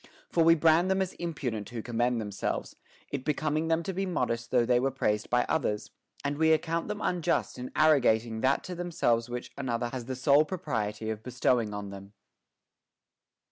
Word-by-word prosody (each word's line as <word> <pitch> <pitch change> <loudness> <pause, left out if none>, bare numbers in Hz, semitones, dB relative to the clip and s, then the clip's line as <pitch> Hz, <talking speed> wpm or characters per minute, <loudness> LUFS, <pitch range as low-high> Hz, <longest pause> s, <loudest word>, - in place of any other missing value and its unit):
For 165 - +3
we 165 +1 +7
brand 165 +3 +4
them 190 0 +2
as 190 -1 -1
impudent 130 -11 -3
who 120 -3 -6
commend 120 0 0
themselves, 105 -2 -3 0.4
it 140 -2 -3
becoming 155 +2 0
them 165 +1 +1
to 190 - -3
be 195 +2 -2
modest 115 -9 -1
though 125 -2 +3
they 120 0 +3
were 135 +2 +1
praised 105 -5 -1
by 125 +1 +3
others; 105 -9 -1 0.3
and 145 +1 -1
we 160 0 +5
account 165 +1 0
them 210 0 -4
unjust 175 -7 0
in 125 - -6
arrogating 115 -7 +3
that 130 +1 +2
to 185 - -6
themselves 165 -10 0
which 120 0 -5
another 120 -3 -1
has 125 -1 -5
the 130 +1 -4
sole 140 +3 +5
propriety 110 - -3
of 110 -1 -5
bestowing 120 -2 +1
on 105 -1 -5
them. 100 +1 -10
130 Hz, 180 wpm, -29 LUFS, 115-160 Hz, 0.4 s, we